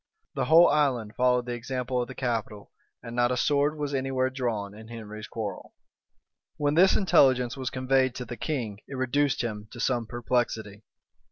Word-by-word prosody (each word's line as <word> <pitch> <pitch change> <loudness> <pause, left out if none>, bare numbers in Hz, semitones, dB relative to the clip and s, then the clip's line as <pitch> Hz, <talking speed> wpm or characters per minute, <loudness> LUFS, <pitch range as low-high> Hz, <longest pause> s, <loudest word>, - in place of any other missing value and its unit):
The 135 - -1
whole 165 +5 +7
island 125 -8 +1
followed 125 -1 +2
the 120 - -3
example 125 +1 -2
of 120 - -3
the 130 - -9
capital; 115 -5 -3 0.3
and 115 0 -7
not 120 0 +2
a 125 - 0
sword 145 +3 +2
was 145 -1 -3
any 135 -1 -1
where 130 0 0
drawn 115 -6 -3
in 110 +1 -12
Henry's 110 -2 -8
quarrel. 105 -4 -6 0.8
When 145 0 +1
this 185 +4 +5
intelligence 130 - +4
was 130 -1 -3
conveyed 130 -1 +1
to 125 - -5
the 120 - -6
king, 120 -9 -3
it 135 - -7
reduced 130 +1 +1
him 105 -2 -5
to 120 - -11
some 120 -2 0
perplexity. 115 -4 -2
125 Hz, 180 wpm, -27 LUFS, 115-135 Hz, 0.8 s, whole